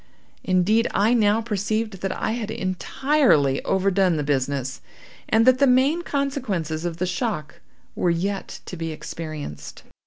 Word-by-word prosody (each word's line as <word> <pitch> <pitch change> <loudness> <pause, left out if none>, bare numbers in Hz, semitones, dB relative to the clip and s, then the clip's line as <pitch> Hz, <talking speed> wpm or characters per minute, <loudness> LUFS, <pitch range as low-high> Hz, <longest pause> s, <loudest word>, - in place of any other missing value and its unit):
Indeed, 195 +5 +2
I 215 +4 +3
now 215 -1 +3
perceived 215 -1 -2
that 195 - -1
I 220 - -2
had 225 -2 -3
entirely 190 - +1
overdone 190 -2 +2
the 150 - -1
business, 135 -2 -1 0.5
and 225 +1 +4
that 255 0 +5
the 280 - +5
main 265 +7 +3
consequences 235 - -2
of 170 -1 -3
the 185 - -1
shock 180 -3 -3 0.3
were 180 - 0
yet 195 +4 -2
to - - -7
be 165 -1 -4
experienced. 155 - -7
195 Hz, 145 wpm, -23 LUFS, 165-230 Hz, 0.5 s, that